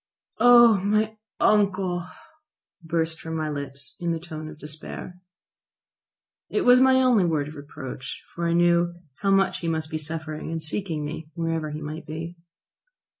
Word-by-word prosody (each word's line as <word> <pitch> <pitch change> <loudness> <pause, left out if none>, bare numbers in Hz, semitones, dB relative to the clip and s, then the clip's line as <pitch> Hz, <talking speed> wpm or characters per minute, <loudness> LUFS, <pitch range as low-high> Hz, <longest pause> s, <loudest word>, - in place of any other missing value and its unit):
"Oh, 240 -3 +8
my 215 +3 +1 0.2
uncle!" 190 -4 +2 0.8
burst 165 0 -1
from 160 0 -5
my 155 -1 -2
lips 140 0 -6
in 170 -1 -1
the 165 - -3
tone 155 -2 -7
of 155 - -11
despair. 155 +4 -7 1.3
It 420 - 0
was 250 -6 +7
my 260 0 +6
only 255 -6 +4
word 155 -4 0
of 150 - -8
reproach, 140 -2 -7
for 170 0 -2
I 170 - +1
knew 175 0 +3 0.2
how 200 - 0
much 195 0 +3
he 170 - -4
must 160 -1 -2
be 155 - -2
suffering 155 0 -5
in 165 0 -2
seeking 155 -1 -3
me, 155 +1 -6
wherever 165 -2 -1
he 150 +1 -6
might 155 +2 -6
be. 165 +2 -6
165 Hz, 160 wpm, -25 LUFS, 155-190 Hz, 1.3 s, Oh